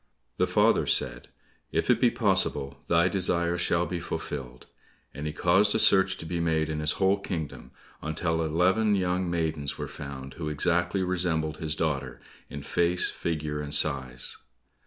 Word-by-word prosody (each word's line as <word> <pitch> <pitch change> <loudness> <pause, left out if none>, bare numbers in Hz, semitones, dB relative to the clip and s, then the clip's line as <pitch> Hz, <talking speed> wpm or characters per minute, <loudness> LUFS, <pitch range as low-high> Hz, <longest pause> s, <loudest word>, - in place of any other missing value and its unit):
The - - +2
father - - +2
said, - - +2 0.4
"If - - +1
it - - +1
be - - +5
possible, 70 0 0
thy 85 +1 +3
desire 90 -3 +1
shall 85 0 +1
be 90 -1 -4
fulfilled," 65 -6 -6 0.5
and 75 +3 -5
he - - -2
caused 90 +7 +3
a - - +2
search 95 -2 +5
to 80 - -8
be 85 +1 -3
made 80 -2 0
in 80 -1 -3
his 75 0 0
whole 95 +1 +1
kingdom, 80 -9 -6 0.3
until 80 +1 -2
eleven 95 +7 +2
young 90 -1 -1
maidens 80 -4 -2
were - - -5
found 70 -2 -8
who 75 -3 -5
exactly 90 +5 +1
resembled 85 -4 -1
his 80 -1 -2
daughter 70 -5 -2 0.3
in 70 -1 -7
face, 85 +4 +2
figure, 75 -2 -3
and 75 0 -1
size. 65 -4 +1
80 Hz, 160 wpm, -27 LUFS, 75-90 Hz, 0.5 s, be